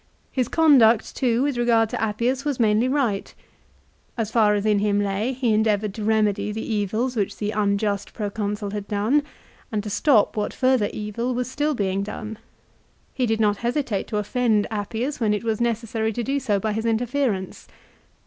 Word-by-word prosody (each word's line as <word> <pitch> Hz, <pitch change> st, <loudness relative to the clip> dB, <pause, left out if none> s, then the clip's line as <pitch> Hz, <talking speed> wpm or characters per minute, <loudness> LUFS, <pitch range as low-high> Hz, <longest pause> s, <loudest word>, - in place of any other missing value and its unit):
His 255 Hz, -3 st, 0 dB
conduct, 250 Hz, -9 st, +4 dB
too, 245 Hz, -1 st, +1 dB
with 280 Hz, -3 st, -1 dB
regard 230 Hz, -2 st, +3 dB
to -, -, -4 dB
Appius 235 Hz, +5 st, 0 dB
was 290 Hz, -4 st, -2 dB
mainly 220 Hz, +1 st, +3 dB
right. 255 Hz, -8 st, 0 dB, 0.9 s
As 220 Hz, -2 st, -2 dB
far 215 Hz, -3 st, +4 dB
as 205 Hz, 0 st, -1 dB
in 210 Hz, -1 st, +3 dB
him 205 Hz, 0 st, +1 dB
lay 205 Hz, +4 st, -1 dB
he 250 Hz, -3 st, 0 dB
endeavoured 215 Hz, -1 st, +1 dB
to 215 Hz, -, -6 dB
remedy 210 Hz, -1 st, +1 dB
the 220 Hz, +1 st, -4 dB
evils 220 Hz, +5 st, -1 dB
which 205 Hz, -4 st, -1 dB
the 210 Hz, 0 st, -2 dB
unjust 200 Hz, -1 st, 0 dB
Pro 205 Hz, -3 st, -4 dB
consul 205 Hz, -1 st, -3 dB
had 205 Hz, -1 st, -5 dB
done, 215 Hz, +8 st, +2 dB, 0.5 s
and 210 Hz, -2 st, -1 dB
to 210 Hz, -, -5 dB
stop 230 Hz, -1 st, +3 dB
what 210 Hz, -1 st, -2 dB
further 255 Hz, -5 st, +2 dB
evil 230 Hz, +4 st, -3 dB
was 250 Hz, +1 st, -2 dB
still 295 Hz, +1 st, 0 dB
being 195 Hz, -3 st, -1 dB
done. 215 Hz, +2 st, -6 dB, 0.7 s
He 255 Hz, -2 st, 0 dB
did 225 Hz, 0 st, 0 dB
not 210 Hz, -2 st, +2 dB
hesitate 240 Hz, -3 st, -2 dB
to 210 Hz, -, -2 dB
offend 215 Hz, 0 st, +1 dB
Appius 225 Hz, +7 st, -3 dB
when 215 Hz, -3 st, +2 dB
it 210 Hz, -, -4 dB
was 225 Hz, -1 st, -1 dB
necessary 230 Hz, -1 st, -1 dB
to 240 Hz, -, -3 dB
do 275 Hz, +4 st, 0 dB
so 210 Hz, -7 st, 0 dB
by 215 Hz, +2 st, -1 dB
his 220 Hz, +2 st, -2 dB
interference. 230 Hz, -3 st, -1 dB
220 Hz, 185 wpm, -23 LUFS, 210-245 Hz, 0.9 s, conduct